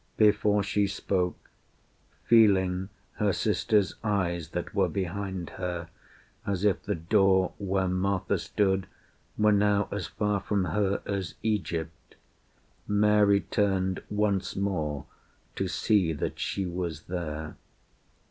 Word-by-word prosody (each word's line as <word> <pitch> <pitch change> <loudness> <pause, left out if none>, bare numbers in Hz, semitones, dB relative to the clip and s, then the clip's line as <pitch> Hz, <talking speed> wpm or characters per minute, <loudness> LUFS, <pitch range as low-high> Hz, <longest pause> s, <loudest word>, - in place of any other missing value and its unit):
Before 105 -1 +4
she 100 +1 +1
spoke, 95 -2 -2 0.7
Feeling 95 -4 +4 0.3
her - - +2
sister's 105 -3 +1
eyes 85 -6 -1
that 90 +5 -5
were 95 -3 +2
behind 95 0 -3
her 90 -2 -3 0.5
As 100 -1 -2
if 100 - +2
the 105 - -2
door 95 +2 +3
where 95 -2 0
Martha 95 +1 0
stood 95 -2 0 0.5
were 105 0 +4
now 105 0 +3
As 95 -5 -3
far 105 +2 -1
from 100 -1 0
her 100 +3 0
as 95 -4 -3
Egypt, 85 -7 -3 0.7
Mary 105 -1 +4
turned 95 -2 0
Once 105 -2 0
more 80 -8 -2 0.5
to - - -1
see 95 -7 +2
that 75 - -4
she 95 - -2
was 85 -3 -4
there. 80 -3 -5
95 Hz, 120 wpm, -28 LUFS, 90-105 Hz, 0.7 s, Before